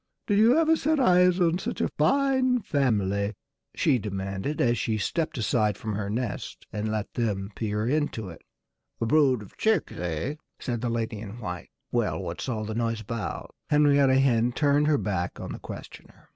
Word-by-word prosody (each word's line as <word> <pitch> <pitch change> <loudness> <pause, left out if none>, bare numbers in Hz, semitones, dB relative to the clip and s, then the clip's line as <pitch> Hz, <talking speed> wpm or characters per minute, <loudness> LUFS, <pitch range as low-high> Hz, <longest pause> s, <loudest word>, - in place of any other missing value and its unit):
"Did 205 -1 +2
you 235 +6 +6
ever 325 0 +4
set 310 0 +1
eyes 180 -6 +5
on 175 0 +2
such - - -4
a - - +2
fine 255 - +2
family?" 100 - 0 0.4
she 125 - +3
demanded 100 +6 -4
as 120 -2 +2
she 110 -1 0
stepped 155 - -1
aside 105 -2 +1
from 110 -1 -4
her 100 0 -3
nest 115 0 -4
and 110 +1 -2
let 110 -1 -3
them 100 -4 -2
peer 105 0 -1
into 145 -7 -1
it. 85 - -11 0.6
"A - - 0
brood 135 -3 +3
of 100 - -16
chicks 220 0 +1
eh?" 90 - -3 0.2
said 120 -3 -3
the 120 - -1
lady 115 -2 -2
in 105 +1 -8
white. 90 -6 -6 0.2
"Well, 120 -3 0
what's 90 +6 -5
all 110 -3 -2
the 110 - -4
noise 115 -1 -1
about?" 110 +1 -5 0.2
Henrietta 140 -3 +4
Hen 120 -3 +3
turned 145 +1 +3
her 150 -1 +4
back 95 -8 -2
on - - -6
her - - -6
questioner. - - -11
120 Hz, 180 wpm, -27 LUFS, 105-150 Hz, 0.6 s, you